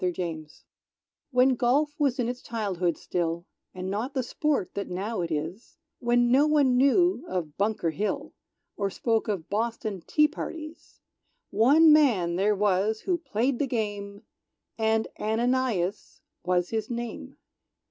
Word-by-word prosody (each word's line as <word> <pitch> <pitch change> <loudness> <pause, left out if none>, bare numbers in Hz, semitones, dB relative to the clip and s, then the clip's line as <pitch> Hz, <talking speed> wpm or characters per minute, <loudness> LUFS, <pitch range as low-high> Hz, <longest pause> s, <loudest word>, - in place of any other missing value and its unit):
Ananias 165 -4 -4 0.6
When 255 -1 +4
Golf 265 +4 +1
was 280 -3 +2
in 245 -3 0
its 245 +1 -4
childhood 190 -7 -2
still, 170 0 -2 0.3
And 185 0 -6
not 235 +8 -3
the 260 - 0
sport 285 - -1
that 200 - -4
now 195 +3 -3
it 170 - -2
is; 160 +8 -5 0.2
When 240 0 +2
no 280 +4 +5
one 285 -4 +3
knew 280 +4 +3
of 160 -5 -4
Bunker 200 -5 0
Hill, 205 +7 -3 0.4
Or 200 -1 -1
spoke 225 +3 0
of 190 -6 -3
Boston 215 -2 -2
tee 300 0 +4
parties; 310 +1 -8 0.5
One 295 +9 +6
man 215 - +3
there 205 +3 +2
was 205 +2 +1
who 365 - 0
played 250 -3 -1
the 285 - +1
game, 205 -4 -4 0.5
And 220 0 +1
Ananias 220 -4 -1 0.2
was 180 0 +1
his 220 -1 -2
name. 240 -1 -6
220 Hz, 140 wpm, -27 LUFS, 185-255 Hz, 0.6 s, One